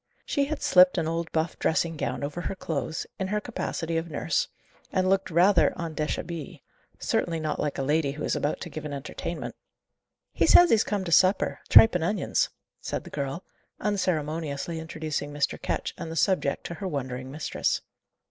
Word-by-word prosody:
She 280 -2 +1
had 305 +2 -4
slipped 180 0 +6
an 160 - 0
old 165 0 -2
buff 160 +1 -1
dressing 165 0 +1
gown 130 -3 -3
over 150 +5 -3
her 195 - -3
clothes, 160 -3 -3
in 190 - -1
her 210 +2 0
capacity 170 -7 -3
of 165 +1 -3
nurse, 145 - 0 0.4
and 185 0 +1
looked 195 0 +2
rather 180 +3 +4
en 165 -1 -3
deshabille; 155 +1 -4 0.4
certainly 165 -2 0
not 155 -1 -2
like 150 - -1
a 135 - -1
lady 145 0 +1
who 150 +1 -6
is - - 0
about 145 - -1
to - - -5
give 155 - -6
an 150 -1 -5
entertainment. 140 -1 -5 0.8
"He - - +2
says 350 0 +8
he's 220 -2 +5
come 205 -2 -2
to 170 - -4
supper: 185 +4 +4
tripe 225 - +9
and 180 -2 0
onions," 195 +3 +1 0.3
said - - -4
the - - -12
girl, 140 +5 -3 0.4
unceremoniously 165 -5 -1
introducing 155 -2 -4
Mr. 145 -1 -1
Ketch - - -2
and 160 - -5
the - - -5
subject 190 +3 +1
to - - -5
her 190 +3 -5
wondering 130 -5 -4
mistress. 145 +2 -1
165 Hz, 185 wpm, -27 LUFS, 150-185 Hz, 0.8 s, tripe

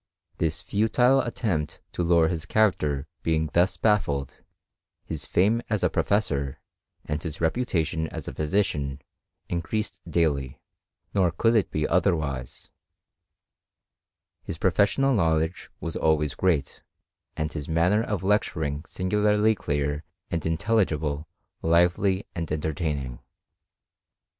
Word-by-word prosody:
This 80 +2 -1
futile 115 +7 +3
attempt 100 - -2
to - - -2
lower 85 -1 +4
his 85 -1 -3
character 75 -11 +2 0.2
being 80 -2 0
thus 90 +3 +3
baffled, 75 - 0 0.6
his 80 -3 -5
fame 110 +6 +3
as 105 -4 0
a - - +3
professor, 70 -10 0 0.5
and 75 0 -2
his 80 -2 -5
reputation 80 -4 0
as - - -7
a - - -4
physician, 75 -5 0 0.5
increased 95 +5 -2
daily: 70 -6 0 0.5
nor 95 -3 +3
could 115 +8 +2
it 110 - +3
be 75 0 -1
other 90 +1 +3
wise; 70 -5 -5 1.7
his - - -6
professional 135 +7 +3
knowledge 80 -4 +1
was 85 - -5
always 75 -2 +2
great, 85 -7 0 0.6
and 80 +2 -2
his 75 -2 -5
manner 85 +6 +3
of 105 -5 -2
lecturing 80 -7 0
singularly 105 +3 +2
clear 75 -5 -2 0.3
and 85 -2 -1
in 80 0 0
telligible, 80 -8 0 0.3
lively, 90 +4 +3
and 85 -2 -4
entertaining. 75 -5 -2
85 Hz, 120 wpm, -26 LUFS, 75-100 Hz, 1.7 s, lower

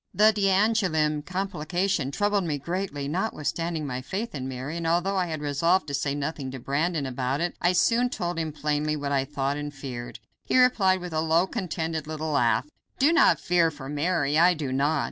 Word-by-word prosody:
The 215 +3 +6
d'Angouleme 190 -7 +2
complication 185 -3 -1
troubled 205 +5 0
me 150 -3 -1
greatly, 170 -2 -3
notwithstanding 165 -2 -2
my 130 -2 -4
faith 205 - -4
in 130 -3 -4
Mary, 130 +5 -5
and 165 -1 -3
although 175 +4 +1
I 185 -2 +1
had 155 -2 -4
resolved 165 +6 +2
to - - -5
say 140 0 -1
nothing 145 -1 -3
to 130 0 -7
Brandon 150 +4 -1
about 130 +1 -2
it, 175 +1 -1
I 175 +1 +3
soon 235 +7 +3
told 175 -7 -3
him 160 -1 -2
plainly 150 0 -1
what 145 -1 -3
I 135 -1 +1
thought 140 0 -2
and 145 0 -4
feared. 130 -4 -7 0.3
He - - +1
replied 195 -7 +4
with 180 -2 -6
a 155 - +1
low, 165 +2 +3
contented 165 -6 -3
little 155 0 -3
laugh. 120 -5 +2 0.3
"Do 290 +5 +4
not 330 - +5
fear 175 -2 +2
for 145 -3 -9
Mary, 150 -1 +1
I 175 +1 +5
do 145 -4 -4
not. 145 +3 +1
160 Hz, 195 wpm, -26 LUFS, 145-185 Hz, 0.3 s, The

